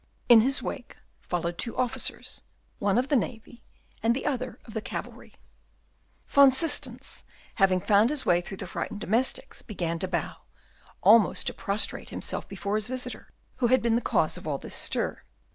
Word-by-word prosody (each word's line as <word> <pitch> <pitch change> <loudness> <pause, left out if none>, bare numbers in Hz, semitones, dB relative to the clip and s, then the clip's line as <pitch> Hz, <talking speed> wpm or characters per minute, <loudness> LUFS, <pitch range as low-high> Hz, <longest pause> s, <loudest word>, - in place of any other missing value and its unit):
In 235 -2 +9
his 270 +4 +1
wake 245 - -6 0.2
followed 170 -1 -3
two 235 - -2
officers, 250 -1 -3 0.4
one 200 +1 +2
of 255 +2 +1
the 295 - +3
navy, 235 -1 -3 0.4
and 230 +2 +2
the 270 - -4
other 255 -3 -2
of 225 - -11
the 220 - -2
cavalry. - - -7 0.9
Van 280 -1 +7
Systens, 265 -3 -1 0.4
having 190 -1 +5
found 210 +5 +4
his 295 -2 -1
way 175 0 +3
through 190 +2 -8
the 195 - -5
frightened 195 +3 -5
domestics, 230 +5 -1
began 170 -6 -3
to 185 - -1
bow, - - -3 0.7
almost 215 -3 +5
to - - 0
prostrate 200 +2 0
himself - - -4
before 200 +1 -2
his 215 0 -1
visitor, 250 0 -5 0.3
who 245 - +2
had 255 0 +3
been 230 -1 +2
the 235 - +1
cause - - +1
of - - -10
all - - -1
this - - -8
stir. - - -1
230 Hz, 175 wpm, -27 LUFS, 200-255 Hz, 0.9 s, In